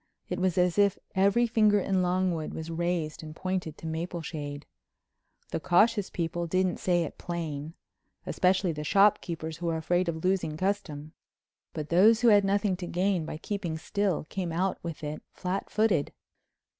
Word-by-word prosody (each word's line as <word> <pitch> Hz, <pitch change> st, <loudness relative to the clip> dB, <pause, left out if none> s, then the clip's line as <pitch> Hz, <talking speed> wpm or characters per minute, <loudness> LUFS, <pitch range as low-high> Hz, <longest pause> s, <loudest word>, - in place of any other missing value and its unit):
It 180 Hz, -, -2 dB
was 185 Hz, -1 st, +1 dB
as 180 Hz, +1 st, +2 dB
if 200 Hz, -1 st, +4 dB, 0.2 s
every 200 Hz, +5 st, +3 dB
finger 215 Hz, -3 st, +4 dB
in 190 Hz, -1 st, +1 dB
Longwood 180 Hz, -3 st, 0 dB
was 160 Hz, +1 st, -5 dB
raised 170 Hz, -2 st, -2 dB
and 155 Hz, -1 st, -9 dB
pointed 185 Hz, -4 st, -3 dB
to -, -, -11 dB
Mapleshade. 160 Hz, -3 st, -5 dB, 0.9 s
The -, -, -1 dB
cautious 205 Hz, +4 st, +3 dB
people 170 Hz, 0 st, -2 dB
didn't 185 Hz, +1 st, +1 dB
say 175 Hz, -2 st, +1 dB
it 160 Hz, -, -7 dB
plain—especially 170 Hz, +3 st, -2 dB
the 150 Hz, -1 st, -5 dB
shop 200 Hz, +6 st, +4 dB
keepers 160 Hz, -2 st, -5 dB
who 170 Hz, 0 st, -4 dB
were 165 Hz, -1 st, 0 dB
afraid 175 Hz, +2 st, +1 dB
of 160 Hz, -1 st, -4 dB
losing 180 Hz, -5 st, 0 dB
custom—but 155 Hz, -4 st, -6 dB
those 215 Hz, +7 st, +5 dB
who 240 Hz, -, +6 dB
had 205 Hz, -2 st, +6 dB
nothing 200 Hz, 0 st, +1 dB
to 175 Hz, -1 st, -6 dB
gain 180 Hz, -2 st, 0 dB
by -, -, -5 dB
keeping 175 Hz, -3 st, -3 dB
still 195 Hz, +2 st, -1 dB
came 175 Hz, +2 st, -4 dB
out 185 Hz, +3 st, 0 dB
with 165 Hz, -3 st, -6 dB
it 150 Hz, +1 st, -4 dB, 0.2 s
flatfooted. 190 Hz, -2 st, 0 dB
175 Hz, 155 wpm, -28 LUFS, 160-195 Hz, 0.9 s, who